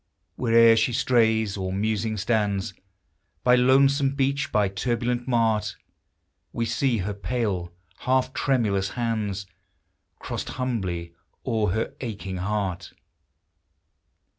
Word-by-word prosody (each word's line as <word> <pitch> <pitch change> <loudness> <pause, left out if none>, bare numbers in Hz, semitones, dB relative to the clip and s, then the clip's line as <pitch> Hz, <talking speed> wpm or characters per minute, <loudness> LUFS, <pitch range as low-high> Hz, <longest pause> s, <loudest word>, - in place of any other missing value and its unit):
Where'er 115 -1 +5
she 115 +2 +2
strays, 110 -4 +2
or 95 -1 -3
musing 110 +2 -1
stands 100 -2 0 0.7
By 125 - +5
lonesome 135 +2 +4
beach, 140 0 0
by 105 -2 +3
turbulent 120 +5 -2
mart, 110 -4 +1 0.8
We 115 - -2
see 120 +1 +1
her 105 - -2
pale, 100 -3 -2 0.3
half 130 0 +1
tremulous 105 -8 +1
hands 105 -5 -2 0.7
Crossed - - -5
humbly 95 -10 -3 0.3
o'er 110 -5 +1
her 110 +1 -2
aching 100 -6 -5
heart 95 -2 -3
110 Hz, 105 wpm, -25 LUFS, 100-125 Hz, 0.8 s, Where'er